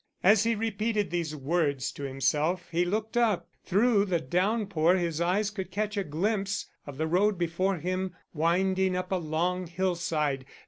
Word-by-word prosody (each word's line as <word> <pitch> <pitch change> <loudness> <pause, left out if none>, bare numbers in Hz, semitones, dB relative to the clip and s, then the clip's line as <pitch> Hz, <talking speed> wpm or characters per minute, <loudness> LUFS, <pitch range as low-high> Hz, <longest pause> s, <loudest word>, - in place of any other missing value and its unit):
As 210 +3 +5
he 230 0 +2
repeated 215 -2 -1
these 165 -3 -2
words 145 -2 0
to - - -10
himself, 145 +6 0
he 175 +1 +2
looked 215 +5 -2
up. 230 -6 +2
Through 205 +1 +3
the 180 -4 0
downpour 185 -1 +1
his 170 -3 -1
eyes 195 +5 +1
could 190 -4 -5
catch 210 +2 -2
a 200 - 0
glimpse 195 +5 -1 0.2
of 140 -2 -8
the 160 - 0
road 190 +5 +2
before 175 +3 0
him, 185 +2 -3 0.2
winding 185 +3 +1
up 185 +1 -4
a - - +2
long 175 +2 -1
hillside. 165 -6 -1
180 Hz, 165 wpm, -28 LUFS, 165-200 Hz, 0.2 s, As